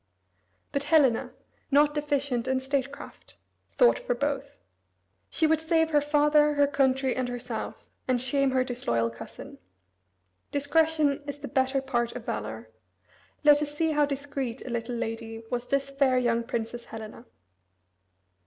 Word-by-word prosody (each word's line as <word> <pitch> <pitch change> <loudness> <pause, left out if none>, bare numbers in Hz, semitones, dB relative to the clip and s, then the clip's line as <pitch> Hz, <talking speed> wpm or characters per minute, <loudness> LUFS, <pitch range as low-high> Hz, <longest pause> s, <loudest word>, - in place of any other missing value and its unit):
But 280 0 -1
Helena, 290 -6 +3 0.4
"not 295 +1 +4
deficient 285 -5 -1
in 260 0 +1
statecraft," 275 +1 -5 0.4
thought - - +4
for - - -2
both. - - -3 0.7
She 320 - +1
would 315 0 +3
save 320 0 +2
her 295 -1 +4
father, 295 0 +3
her 285 0 +5
country, 265 -2 +1
and 255 -1 -1
herself, 245 -2 -5 0.2
and 255 -1 +2
shame 270 +2 +2
her 260 -1 +2
disloyal 120 - -1
cousin. 115 - -10 0.9
Discretion 295 0 +2
is 285 0 -5
the 290 -1 -7
better 265 +1 +1
part 240 -3 -1
of 245 -2 -8
valor. 110 +1 -5 0.7
Let 295 0 +6
us 295 0 -4
see 320 0 +2
how 295 -1 +3
discreet 275 -3 -4
a 255 - -5
little 235 +1 -3
lady 225 0 -5
was 245 0 -2
this 275 0 0
fair 275 -2 +2
young 235 -2 +1
Princess 235 0 -4
Helena. 220 +2 -9
270 Hz, 145 wpm, -27 LUFS, 240-290 Hz, 0.9 s, Let